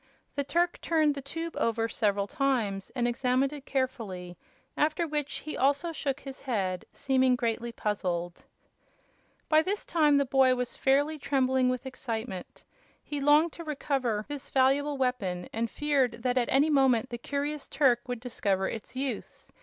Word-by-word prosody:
The 280 - -1
Turk 345 +4 0
turned 310 -3 +2
the 280 - -6
tube 330 +5 -5
over 230 0 +1
several 205 -3 0
times 230 -7 -1
and 240 -2 +1
examined 255 +3 +1
it 285 -2 -9
carefully, 220 -10 -3 0.4
after 315 +3 +1
which 295 -2 -2
he 310 - -4
also 285 +5 +2
shook 285 -3 -2
his 270 -1 -9
head, 195 -8 -2
seeming 260 -1 +2
greatly 235 0 -2
puzzled. 180 -6 -2 1.0
By 310 0 +5
this 395 +5 -3
time 300 -4 +4
the 280 - +3
boy 260 -1 +4
was 250 -1 -3
fairly 290 +3 +2
trembling 260 -2 +2
with 255 +1 -2
excitement. 225 -7 -5 0.4
He 290 -1 -4
longed 300 +4 +5
to 340 - -8
recover 270 -8 -1
this 290 -2 -6
valuable 280 +2 +2
weapon, 215 -9 -1
and 230 +1 -1
feared 260 -5 0
that 250 -1 +1
at 250 -2 +1
any 290 +4 +4
moment 260 -3 +3
the 240 - -4
curious 285 +3 -3
Turk 260 -4 +3
would 245 -2 -4
discover 200 -6 0
its 225 +3 -6
use. 265 0 -4
260 Hz, 160 wpm, -29 LUFS, 235-285 Hz, 1.0 s, By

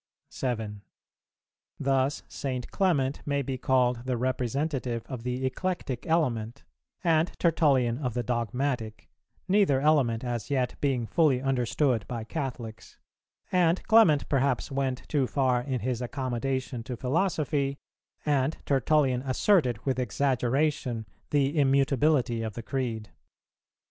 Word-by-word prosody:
7. 110 -5 -3 1.0
Thus, 135 +1 +1
St. 130 -3 -4
Clement 145 -8 +1
may 140 -1 -1
be 130 0 -4
called 125 -2 +1
the 130 -2 -1
representative 130 0 -1
of 130 -4 -6
the 125 +2 -2
eclectic 130 -2 -3
element, 120 -9 0 0.4
and 165 0 +3
Tertullian 140 -8 +2
of 125 -5 -3
the 120 - 0
dogmatic, 120 -1 -2 0.4
neither 190 -9 +3
element 135 -6 +2
as 120 -4 -3
yet 130 -3 0
being 130 -5 +1
fully 135 +3 +3
understood 130 -2 0
by 115 -2 -4
Catholics; 120 -4 -6 0.5
and 175 -1 +3
Clement 220 -11 +5
perhaps 140 -1 0
went 135 -2 -2
too 140 -4 +1
far 130 -3 +1
in 130 -2 -3
his 125 +1 -2
accommodation 130 0 -2
to 120 +1 -6
philosophy, 140 - 0 0.5
and 145 0 +1
Tertullian 135 -1 +2
asserted 130 - +2
with 130 -2 0
exaggeration 130 0 0 0.2
the 145 +1 +1
immutability 135 -3 +2
of 110 -2 -4
the 120 - -6
Creed. 115 -6 -3
130 Hz, 120 wpm, -28 LUFS, 120-145 Hz, 1.0 s, Clement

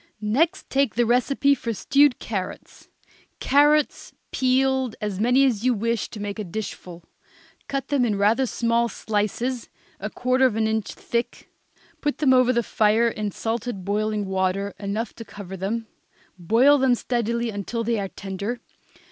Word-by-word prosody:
Next 295 - 0
take 270 -7 +1
the 240 +1 +3
recipe 270 +4 +3
for 230 -5 -3
stewed 275 +4 +3
carrots. 195 -5 -6 0.5
Carrots, 295 +1 +2 0.2
peeled, 260 -1 +1
as 205 -3 -3
many 250 +5 +4
as 230 -5 0
you 250 -1 +3
wish 230 +1 -1
to 215 - -9
make 205 +1 -5
a - - -2
dishful; 180 -3 -7 0.6
cut 275 -1 -3
them 285 -3 +2
in 215 -4 +1
rather 225 +6 +3
small 235 0 +1
slices, 225 +4 -2 0.3
a 210 - -4
quarter 255 +3 +2
of 230 - -3
an 220 0 +1
inch 220 -1 -1
thick, 235 0 -4 0.5
put 295 -1 -1
them 275 -4 +4
over 255 -1 +5
the 235 -1 +1
fire 220 +2 +2
in 215 -2 -3
salted 225 -1 -4
boiling 210 +1 -1
water 190 +1 -1
enough 210 +3 -3
to 230 - -7
cover 200 -3 -9
them; 210 +5 -3 0.5
boil 230 +11 +4
them 260 -2 +4
steadily 235 -1 -1
until 215 +3 -3
they 230 -1 0
are 195 - -2
tender. 200 +6 -5
230 Hz, 155 wpm, -24 LUFS, 205-255 Hz, 0.6 s, over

